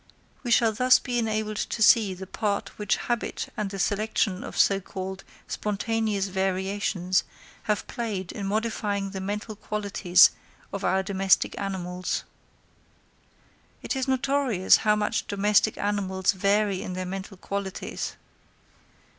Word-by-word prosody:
We 245 - -5
shall 235 -1 +4
thus 255 +4 +5
be 245 -2 -2
enabled 215 -1 -1
to 220 - -1
see 205 -3 +5
the 190 +1 -8
part 200 +1 -2
which 210 -2 +1
habit 240 -2 -3
and 210 -2 -2
the 195 - -6
selection 205 -1 0
of - - -7
so 195 -1 +4
called 190 0 -6 0.2
spontaneous 210 -1 -1
variations 190 0 0 0.5
have 210 - +1
played 205 -6 -4
in 200 -2 -4
modifying 205 -2 -1
the 190 -1 -5
mental 210 +3 -4
qualities 200 -4 +4 0.4
of 200 - -4
our 190 0 +2
domestic 195 -1 +2
animals. 185 -2 -3 1.6
It - - -2
is 265 0 -1
notorious 265 -6 +3
how 210 -1 +2
much 210 +2 -1
domestic 205 +2 +2
animals 195 -2 0
vary 200 0 +1
in 185 - -5
their 185 0 -3
mental 195 +1 -6
qualities. 200 0 -4
200 Hz, 130 wpm, -26 LUFS, 190-215 Hz, 1.6 s, thus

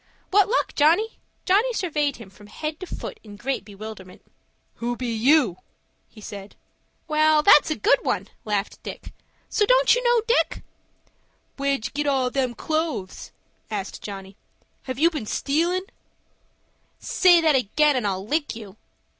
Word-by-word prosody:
"What 405 0 +4
luck, - - 0
Johnny?" 320 +8 +4
repeated 445 - -12
Dick. - - -44
Johnny 425 +7 +3
surveyed 300 -8 -1
him 230 -5 -12
from 205 +1 -16
head 305 +8 -5
to 370 - -7
foot - - -7
in 210 -2 -11
great 265 +4 -3
bewilderment. 200 -2 -10 0.5
"Who 240 +1 -2
be 245 -2 -3
you?" 240 - +3 0.5
he 220 - -16
said. 200 -1 -9 0.5
"Well, 310 0 +3
that's 295 - +7
a 310 - 0
good 415 +9 +3
one," - - -2 0.2
laughed 210 -1 -2
Dick; - - -9 0.3
"so - - -3
you - - +1
don't - - +5
know 480 -1 +3
Dick?" 485 - +1 0.9
"Where'd 275 -4 -1
you - - -3
get 295 +1 -2
all 260 -3 +1
them 255 -3 -1
clothes?" 310 - -3 0.4
asked 200 -3 -5
Johnny. 195 -1 -8 0.5
"Have 260 -2 -4
you 330 +4 +4
been 285 -10 -5
stealin'?" 340 - 0 1.1
"Say 355 -2 +4
that 315 -3 +3
again, 280 +5 +2
and 245 -5 0
I'll 190 0 -3
lick 295 +4 -1
you. 210 -3 -10
280 Hz, 160 wpm, -24 LUFS, 215-325 Hz, 1.1 s, that's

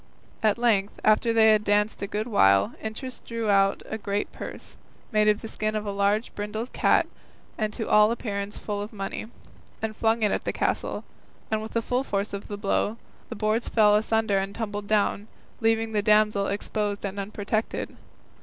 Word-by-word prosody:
At 215 -1 +3
length, 215 -4 +1
after 215 +2 +4
they 220 -1 +6
had 215 -1 +3
danced 210 +1 +1
a 200 - -2
good 210 +2 -2
while, 100 - +4
Interest 245 +4 -6
drew 230 -2 -1
out 195 0 +3
a 220 - -5
great 205 0 -2
purse, - - -8 0.4
made 215 -1 +3
of 210 +1 +2
the - - -4
skin 215 0 -2
of 215 0 -2
a 205 - -2
large 200 +3 +1
brindled 215 +4 -5
cat - - +3 0.5
and 215 -1 -1
to 225 - -4
all 210 0 +6
appearance 205 -3 -3
full 205 -1 -4
of 205 - -6
money, 200 +1 -5 0.5
and 220 -1 -3
flung 225 +1 +1
it 210 - +3
at - - -1
the - - -1
castle, - - -1 0.5
and 215 0 +1
with 220 - -7
the 230 - 0
force 220 -6 -1
of 200 - -5
the 205 - -5
blow 205 +2 0 0.3
the - - -5
boards 215 +2 0
fell 210 -2 +5
asunder 220 -2 +2
and 195 +1 -4
tumbled 205 -2 -4
down, 205 0 +1 0.3
leaving 225 0 +1
the 210 -1 +1
damsel 210 -1 +3
exposed 205 0 -2
and 200 0 -4
unprotected. 210 +2 -3
210 Hz, 185 wpm, -26 LUFS, 205-220 Hz, 0.5 s, they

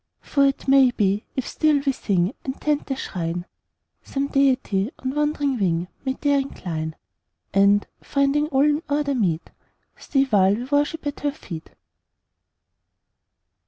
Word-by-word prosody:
"For 280 -1 +2
it 275 - -2
may 270 -1 +6
be, 205 -3 0
if 260 - -2
still 305 -2 +2
we 275 - +3
sing 190 -4 0
And 265 0 -5
tend 295 -1 0
the 270 - -1
Shrine, 175 -7 -4 0.6
Some 280 0 -3
Deity 255 -7 +2
on 260 0 -3
wandering 295 -3 0
wing 175 -2 0
May 265 -1 0
there 285 -1 +3
incline; 160 - -4 0.6
And, 200 +1 +4 0.2
finding 280 +2 +1
all 275 -2 +3
in 300 +1 +2
order 290 0 +1
meet, 180 -10 -1 0.5
Stay 270 -2 +1
while 200 -6 +3
we 235 - -4
worship 290 +4 0
at 290 0 -3
Her 290 - 0
feet." 170 - -9
265 Hz, 145 wpm, -23 LUFS, 195-285 Hz, 0.6 s, may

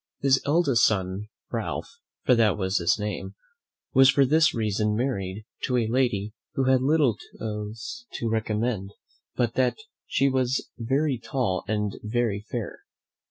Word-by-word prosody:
His 135 -1 +3
eldest 145 -7 +3
son 100 0 +1 0.2
Ralph, 470 - -4 0.3
for 125 - +5
that 110 -4 +3
was 95 -1 0
his 85 0 +2
name, 105 0 -4 0.6
was 135 0 +7
for 135 0 +5
this 155 +4 +4
reason 105 -2 0
married 105 -5 -2 0.2
to 125 - +1
a 120 - +2
lady 110 -4 0 0.2
who 135 - +1
had 130 -1 +4
little 140 -5 +3 0.2
else 110 - -5
to 115 - -2
recommend 110 -2 -1
her - - -34 0.4
but 120 -2 +1
that 125 -1 +1 0.3
she 135 - +2
was 130 -1 0
very 135 +3 0
tall 115 -6 -1
and 105 -1 -1
very 110 -2 -1
fair. 120 -5 -4
115 Hz, 150 wpm, -26 LUFS, 105-130 Hz, 0.6 s, was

